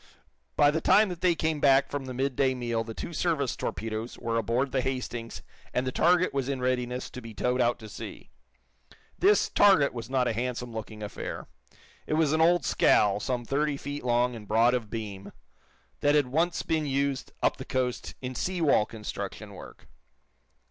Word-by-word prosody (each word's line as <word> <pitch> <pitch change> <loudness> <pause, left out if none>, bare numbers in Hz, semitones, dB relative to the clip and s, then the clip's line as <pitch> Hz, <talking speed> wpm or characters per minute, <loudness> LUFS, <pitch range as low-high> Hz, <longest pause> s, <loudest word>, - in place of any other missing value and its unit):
By 145 - +5
the 160 +1 -1
time 210 0 +5
that 175 -2 -6
they 180 -2 +3
came 160 -1 -1
back 135 -1 +4
from 145 -2 -3
the 130 - -6
midday 130 0 +1
meal 120 -2 -1
the 115 -1 -8
two 170 - -6
service 150 -6 0
torpedoes 110 +1 -4
were 115 0 -3
aboard 120 +5 0
the 130 - +1
"Hastings" 125 -3 -4 0.3
and 125 - +1
the 130 - -1
target 180 +4 +3
was 135 -1 -1
in 135 -2 -2
readiness 125 0 -1
to 125 - -8
be 115 -2 -10
towed 125 +4 0
out 120 0 +2
to 110 - -10
sea. 105 - -9 0.9
This 410 +3 +4
"target" 190 -9 +4
was 115 -1 -6
not 130 -2 +1
a - - 0
handsome 125 +1 -3
looking 110 -1 -7
affair. 105 - -6 0.6
It 155 - 0
was 155 -2 +2
an 160 - +2
old 175 +1 +4
scow, 100 -1 +3
some 120 +1 -2
thirty 145 +3 0
feet 145 0 -6
long 120 0 +1
and 105 -2 -10
broad 115 +4 +4
of 120 -4 -2
beam, 100 -4 -6 0.7
that 145 0 +3
had 145 -2 +4
once 165 +6 0
been 155 -2 0
used, 140 -1 -1
up - - +2
the - - -6
coast, 125 -1 -2
in 130 0 -3
sea 180 +8 -2
wall 140 -9 +3
construction 110 -2 -6
work. - - -12
130 Hz, 190 wpm, -28 LUFS, 115-145 Hz, 0.9 s, By